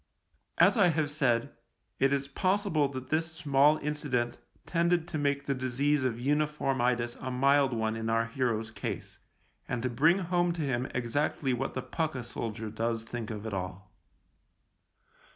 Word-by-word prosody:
As -, -, +5 dB
I 200 Hz, -4 st, +6 dB
have 155 Hz, -3 st, +1 dB
said, 135 Hz, -3 st, +1 dB, 0.4 s
it 135 Hz, +1 st, +3 dB
is 140 Hz, 0 st, 0 dB
possible 185 Hz, -1 st, +1 dB
that 130 Hz, -1 st, -7 dB
this 160 Hz, +1 st, 0 dB
small 145 Hz, 0 st, +4 dB
incident 140 Hz, -5 st, -1 dB, 0.3 s
tended 170 Hz, -1 st, +1 dB
to 155 Hz, -, -2 dB
make 140 Hz, -1 st, 0 dB
the 140 Hz, -, +1 dB
disease 130 Hz, +2 st, 0 dB
of 125 Hz, -3 st, 0 dB
unif 150 Hz, +5 st, 0 dB
orm 135 Hz, -2 st, 0 dB
itis 120 Hz, -1 st, +1 dB
a 130 Hz, -, -4 dB
mild 135 Hz, +2 st, +3 dB
one 110 Hz, -1 st, -1 dB
in 110 Hz, 0 st, -3 dB
our 115 Hz, 0 st, +2 dB
hero's 115 Hz, -2 st, -1 dB
case, -, -, -6 dB, 0.5 s
and 120 Hz, -1 st, -2 dB
to 125 Hz, -, 0 dB
bring 155 Hz, +9 st, +4 dB
home 175 Hz, -2 st, +1 dB
to 165 Hz, -2 st, -3 dB
him 130 Hz, -2 st, -1 dB
exactly 130 Hz, +2 st, 0 dB
what 135 Hz, +2 st, -3 dB
the 130 Hz, -, -2 dB
pukka 145 Hz, -1 st, -2 dB
soldier 110 Hz, -2 st, -5 dB
does 115 Hz, +1 st, -1 dB
think 115 Hz, -1 st, -5 dB
of 105 Hz, -1 st, -6 dB
it 110 Hz, -, -4 dB
all. 95 Hz, +1 st, -5 dB
135 Hz, 170 wpm, -30 LUFS, 120-150 Hz, 0.5 s, I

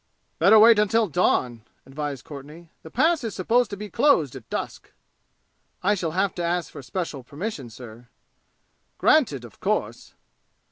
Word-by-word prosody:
"Better 220 Hz, -, +6 dB
wait 225 Hz, 0 st, +7 dB
until 220 Hz, +2 st, +3 dB
dawn," 125 Hz, -6 st, 0 dB, 0.2 s
advised 140 Hz, -2 st, -6 dB
Courtenay. 150 Hz, +4 st, -11 dB
"The 160 Hz, -, -11 dB
Pass 315 Hz, -, +2 dB
is 225 Hz, -, -4 dB
supposed 230 Hz, +5 st, +1 dB
to 200 Hz, -, -6 dB
be 210 Hz, +1 st, -6 dB
closed 170 Hz, -, +2 dB
at 125 Hz, -4 st, -11 dB
dusk." -, -, -5 dB, 0.9 s
"I 205 Hz, +3 st, +3 dB
shall 170 Hz, -6 st, -3 dB
have 195 Hz, 0 st, +1 dB
to 175 Hz, -, -4 dB
ask 170 Hz, -1 st, -1 dB
for -, -, -9 dB
special 155 Hz, 0 st, -5 dB
permission, 145 Hz, -, -6 dB
sir." 115 Hz, 0 st, -12 dB, 0.9 s
"Granted, 150 Hz, -, +2 dB
of 115 Hz, -, -15 dB
course." -, -, -3 dB
170 Hz, 150 wpm, -24 LUFS, 135-215 Hz, 0.9 s, wait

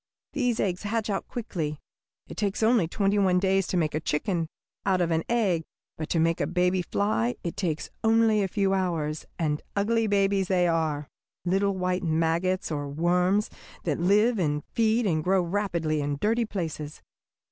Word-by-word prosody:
These 245 Hz, -5 st, 0 dB
eggs 185 Hz, -2 st, 0 dB
hatch 215 Hz, +1 st, -1 dB
out 195 Hz, -, -2 dB
quickly. 165 Hz, -10 st, -4 dB, 0.5 s
It -, -, -9 dB
takes 205 Hz, +1 st, -1 dB
only 225 Hz, -6 st, +4 dB
twenty 200 Hz, +3 st, +1 dB
one 185 Hz, -2 st, +3 dB
days 195 Hz, 0 st, +2 dB
to 185 Hz, -, -1 dB
make 155 Hz, -3 st, +1 dB
a 155 Hz, -, 0 dB
chicken 165 Hz, +2 st, -1 dB, 0.4 s
out 190 Hz, -2 st, +2 dB
of 170 Hz, -1 st, +1 dB
an 160 Hz, 0 st, +1 dB
egg, 205 Hz, -8 st, +2 dB, 0.3 s
but 155 Hz, 0 st, -5 dB
to 165 Hz, -, +1 dB
make 165 Hz, +1 st, +2 dB
a 145 Hz, -, +1 dB
baby 180 Hz, +2 st, +1 dB
fly 145 Hz, -, 0 dB
it 170 Hz, -, -3 dB
takes 165 Hz, -6 st, -2 dB
only 225 Hz, -1 st, +4 dB
a 195 Hz, -, +1 dB
few 195 Hz, 0 st, +1 dB
hours, 165 Hz, -5 st, -1 dB
and 150 Hz, -2 st, -1 dB
ugly 225 Hz, +2 st, +1 dB
babies 195 Hz, -2 st, +2 dB
they 180 Hz, -2 st, +2 dB
are 155 Hz, -3 st, 0 dB, 0.4 s
little 195 Hz, +2 st, +1 dB
white 180 Hz, 0 st, 0 dB
maggots, 165 Hz, +2 st, 0 dB
or 145 Hz, -2 st, -3 dB
worms, 180 Hz, +7 st, +1 dB, 0.3 s
that -, -, -1 dB
live 210 Hz, +6 st, +3 dB
and 150 Hz, -4 st, 0 dB
feed 225 Hz, +1 st, +2 dB
and 160 Hz, -5 st, +1 dB
grow 185 Hz, +1 st, +3 dB
rapidly 170 Hz, -5 st, -1 dB
in 145 Hz, 0 st, -2 dB
dirty 230 Hz, +5 st, +1 dB
places. 160 Hz, -7 st, -5 dB
185 Hz, 175 wpm, -27 LUFS, 160-205 Hz, 0.5 s, only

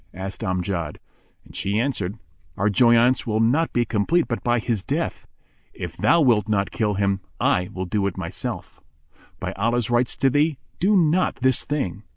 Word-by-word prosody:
asked 95 Hz, 0 st, -6 dB
Amjad; 90 Hz, -4 st, -2 dB, 0.5 s
and -, -, -16 dB
she 100 Hz, +1 st, -1 dB
answered, 110 Hz, -6 st, -1 dB, 0.4 s
"Our 105 Hz, +2 st, +1 dB
joyaunce 120 Hz, +3 st, +4 dB
will 110 Hz, -1 st, 0 dB
not 130 Hz, +9 st, +2 dB
be 120 Hz, -1 st, +1 dB
complete 120 Hz, +11 st, +1 dB
but 115 Hz, -, -3 dB
by 120 Hz, 0 st, +2 dB
his 115 Hz, -3 st, -1 dB
death. -, -, -3 dB, 0.5 s
If -, -, -6 dB
thou 170 Hz, -, +3 dB
wilt 115 Hz, -6 st, +3 dB
not 100 Hz, -2 st, 0 dB
kill 105 Hz, -2 st, 0 dB
him, 100 Hz, 0 st, +1 dB, 0.2 s
I 90 Hz, 0 st, +1 dB
will 95 Hz, 0 st, -4 dB
do 100 Hz, +2 st, 0 dB
it 100 Hz, -, -5 dB
myself." -, -, -5 dB
Quoth -, -, -29 dB
Amjad, 75 Hz, -1 st, -33 dB
"By -, -, -3 dB
Allah's 120 Hz, +1 st, +1 dB
rights 120 Hz, +1 st, +1 dB
to 135 Hz, 0 st, +2 dB
thee, 145 Hz, +1 st, +2 dB, 0.2 s
do 200 Hz, +3 st, +3 dB
not 175 Hz, +1 st, +2 dB
this 130 Hz, 0 st, +3 dB
thing!" 120 Hz, -, -2 dB
115 Hz, 185 wpm, -23 LUFS, 100-130 Hz, 0.5 s, joyaunce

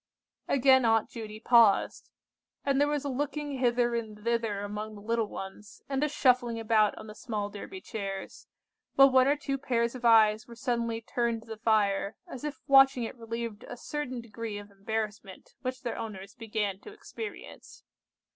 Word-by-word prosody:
Again 265 Hz, -1 st, +5 dB
Aunt 225 Hz, -1 st, +2 dB
Judy 215 Hz, -2 st, -7 dB
paused, 230 Hz, -3 st, +4 dB, 0.6 s
and 275 Hz, 0 st, +2 dB
there 290 Hz, -, +4 dB
was 295 Hz, -1 st, -1 dB
a -, -, 0 dB
looking 290 Hz, +1 st, -3 dB
hither 240 Hz, -1 st, +2 dB
and 215 Hz, -3 st, -4 dB
thither 230 Hz, -3 st, 0 dB
among 210 Hz, +1 st, -5 dB
the 205 Hz, -, -11 dB
little 230 Hz, +1 st, 0 dB
ones, 195 Hz, +1 st, -9 dB
and 275 Hz, 0 st, -1 dB
a 300 Hz, -, +1 dB
shuffling 250 Hz, -5 st, +2 dB
about 220 Hz, -2 st, +2 dB
on -, -, -9 dB
the 215 Hz, -, -9 dB
small 210 Hz, -2 st, -4 dB
Derby 370 Hz, -, -8 dB
chairs, 195 Hz, -, -6 dB, 0.5 s
while 275 Hz, 0 st, +7 dB
one 260 Hz, 0 st, +5 dB
or 285 Hz, -, +4 dB
two 275 Hz, -2 st, -3 dB
pairs 235 Hz, -3 st, 0 dB
of 255 Hz, -2 st, -9 dB
eyes 220 Hz, -2 st, +5 dB
were 235 Hz, -, -11 dB
suddenly 235 Hz, -2 st, -1 dB
turned 235 Hz, -1 st, -1 dB
to 225 Hz, -, -19 dB
the 220 Hz, -, -6 dB
fire, 210 Hz, -2 st, +1 dB
as 260 Hz, -, -8 dB
if 300 Hz, -1 st, -5 dB
watching 270 Hz, -3 st, +6 dB
it 225 Hz, -, -5 dB
relieved 230 Hz, -1 st, -5 dB
a -, -, -8 dB
certain 255 Hz, -2 st, -4 dB
degree 225 Hz, -1 st, -6 dB
of 205 Hz, 0 st, -10 dB
embarrassment 205 Hz, -1 st, -5 dB
which 255 Hz, 0 st, -4 dB
their 240 Hz, -, -3 dB
owners 200 Hz, -3 st, -7 dB
began 210 Hz, -4 st, -3 dB
to 420 Hz, -, -11 dB
experience. 425 Hz, +1 st, -9 dB
230 Hz, 175 wpm, -29 LUFS, 215-260 Hz, 0.6 s, while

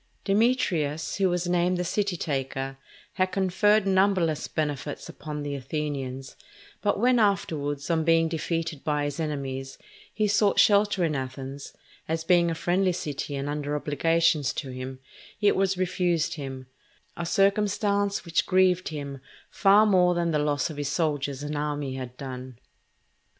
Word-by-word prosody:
Demetrius, 190 Hz, -, +1 dB
who 195 Hz, -2 st, +3 dB
was 175 Hz, 0 st, -1 dB
named 175 Hz, +1 st, +2 dB
the 180 Hz, -, -1 dB
"City 195 Hz, +1 st, -1 dB
taker," 135 Hz, -2 st, -3 dB, 0.3 s
had 185 Hz, 0 st, 0 dB
conferred 195 Hz, +3 st, +2 dB
numberless 190 Hz, -5 st, +2 dB
benefits 145 Hz, -2 st, -3 dB
upon 150 Hz, -1 st, -6 dB
the 145 Hz, 0 st, -3 dB
Athenians; 135 Hz, -1 st, -4 dB, 0.5 s
but 205 Hz, -1 st, +1 dB
when, 245 Hz, +2 st, +4 dB
afterwards, 145 Hz, -9 st, 0 dB
on 160 Hz, -1 st, +2 dB
being 165 Hz, 0 st, +4 dB
defeated 165 Hz, -2 st, -3 dB
by 150 Hz, -1 st, 0 dB
his 145 Hz, +1 st, -3 dB
enemies, 135 Hz, -4 st, -4 dB, 0.3 s
he 215 Hz, -1 st, 0 dB
sought 205 Hz, 0 st, +3 dB
shelter 205 Hz, -2 st, +4 dB
in 155 Hz, -2 st, -1 dB
Athens, 135 Hz, +1 st, -6 dB, 0.3 s
as 160 Hz, 0 st, -1 dB
being 175 Hz, 0 st, +4 dB
a 165 Hz, -, -2 dB
friendly 180 Hz, +3 st, +1 dB
city 145 Hz, -3 st, -4 dB
and 140 Hz, +1 st, -3 dB
under 145 Hz, 0 st, -2 dB
obligations 155 Hz, 0 st, +1 dB
to 135 Hz, -4 st, -5 dB
him, 130 Hz, +1 st, -6 dB, 0.4 s
it 205 Hz, -1 st, +3 dB
was 195 Hz, 0 st, +1 dB
refused 175 Hz, -2 st, 0 dB
him; 135 Hz, -4 st, -6 dB, 0.5 s
a 170 Hz, -, -4 dB
circumstance 200 Hz, +1 st, +1 dB
which 165 Hz, -1 st, 0 dB
grieved 185 Hz, -1 st, +3 dB
him 140 Hz, -3 st, -6 dB, 0.3 s
far 205 Hz, +2 st, +5 dB
more 180 Hz, -4 st, +4 dB
than 170 Hz, -1 st, 0 dB
the 150 Hz, -, +1 dB
loss 145 Hz, +1 st, 0 dB
of 150 Hz, -, -9 dB
his 145 Hz, -1 st, -2 dB
soldiers 145 Hz, -4 st, -1 dB
and 150 Hz, +1 st, -4 dB
army 145 Hz, -2 st, -2 dB
had 125 Hz, -1 st, -7 dB
done. 130 Hz, -2 st, -7 dB
160 Hz, 150 wpm, -26 LUFS, 145-185 Hz, 0.5 s, far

